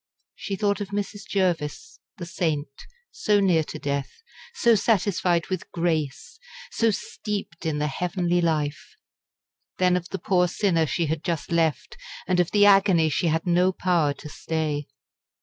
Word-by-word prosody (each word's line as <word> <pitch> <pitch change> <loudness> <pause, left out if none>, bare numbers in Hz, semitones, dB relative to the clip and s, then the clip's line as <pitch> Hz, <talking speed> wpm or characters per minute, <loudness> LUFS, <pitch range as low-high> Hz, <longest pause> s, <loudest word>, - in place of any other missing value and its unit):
She 195 - -5
thought 205 0 0
of 205 - -3
Mrs. 205 +1 -5
Jervis 185 - -2 0.2
the 175 - -6
saint 155 -5 -3 0.2
so 210 - +2
near 180 -5 +3
to - - -7
death, 140 -1 -2 0.5
so 235 - +4
satisfied 190 -5 +1
with 185 - -4
"grace," 165 - -2 0.3
so 230 - +2
steeped 200 -4 -4
in 155 -2 -1
the 150 - 0
heavenly 175 +3 0
life; 155 - -2 0.8
then 180 -1 +3
of 180 0 -3
the 195 - -3
poor 180 -3 +2
sinner 175 -3 +1
she 170 +3 0
had 160 +1 -2
just 170 -2 -3
left 165 - 0 0.3
and 180 -1 +2
of 175 - +2
the 205 -1 +4
agony 195 -5 +5
she 170 - 0
had 165 +1 0
no 180 +1 +3
power 175 -5 +1
to 150 - -10
stay. 150 -1 -3
175 Hz, 155 wpm, -25 LUFS, 160-195 Hz, 0.8 s, agony